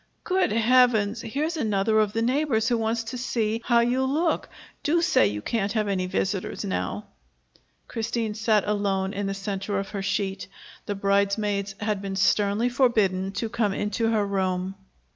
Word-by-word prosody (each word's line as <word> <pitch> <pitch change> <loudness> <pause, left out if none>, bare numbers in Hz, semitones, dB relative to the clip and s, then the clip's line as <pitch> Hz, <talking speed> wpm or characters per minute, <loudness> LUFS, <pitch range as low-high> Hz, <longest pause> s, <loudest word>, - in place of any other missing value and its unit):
"Good 370 0 +1
Heavens! 230 -1 +3
Here's 305 +9 -2
another 215 -3 +1
of 210 -2 +2
the 225 - 0
neighbors 250 -3 +1
who 240 - +2
wants 225 +1 0
to 230 +2 -6
see 230 -3 -1
how 235 -1 +4
you 245 +2 +1
look. 310 +6 0 0.3
Do 330 +3 +2
say 345 - +4
you 105 +1 -4
can't 205 -3 -1
have 215 -2 0
any 185 -2 -1
visitors 190 +2 -2
now." 205 +2 -3 0.8
Christine 225 -1 -2
sat 215 -2 +1
alone 200 -2 0
in 200 -1 -2
the 195 - -2
center 195 0 -3
of 195 0 -3
her 205 -2 -4
sheet. 195 -1 -2 0.4
The 205 - -2
bridesmaids 200 0 0
had 210 -1 -1
been 195 -1 -4
sternly 205 +4 +2
forbidden 215 -7 +2
to 215 +4 -2
come 215 -3 0
into 215 +2 -1
her 215 -2 +1
room. 190 -1 -1
210 Hz, 165 wpm, -25 LUFS, 195-235 Hz, 0.8 s, how